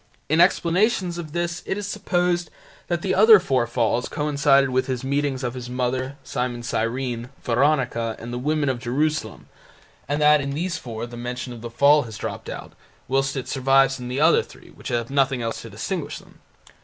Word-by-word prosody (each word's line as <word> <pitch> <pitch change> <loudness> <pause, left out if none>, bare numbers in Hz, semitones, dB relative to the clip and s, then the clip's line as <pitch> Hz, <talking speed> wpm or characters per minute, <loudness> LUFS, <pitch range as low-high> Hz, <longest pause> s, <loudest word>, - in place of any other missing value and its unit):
In 160 +3 +4
explanations 180 0 +2
of 160 -3 -7
this 170 0 -2
it 190 - -1
is 205 - -4
supposed 180 -4 0 0.4
that 170 -1 -2
the 185 - 0
other 215 +2 +8
four 130 -9 0
falls 120 0 0
coincided 140 -2 +2
with 130 +1 +1
His 130 -2 -3
meetings 140 -1 -1
with 120 -1 -2
His 125 -1 -7
Mother, 130 +2 -2
Simon 125 -1 -3
of - - -9
Cyrene, 120 +1 -2
Veronica, 120 -3 +1
and 120 +1 -7
the 120 - -3
women 150 +2 0
of 130 -2 0
Jerusalem, 135 -1 -2 0.6
and 145 +1 -1
that 150 0 +5
in 140 0 -3
these 170 +2 -2
four 115 -2 -6
the 120 0 -10
mention 125 +1 -5
of 115 - -10
the 120 - -6
fall 140 +5 +5
has 115 -5 -8
dropped - - -6
out - - -8 0.3
whilst 135 +1 0
it 130 - -4
survives 135 0 +3
in 125 - -6
the 125 +2 -3
other 160 +3 +5
three - - -15
which - - -11
have 120 0 -2
nothing 135 -3 +1
else 115 0 -3
to - - -9
distinguish - - -4
them. - - -17
135 Hz, 195 wpm, -23 LUFS, 125-155 Hz, 0.6 s, other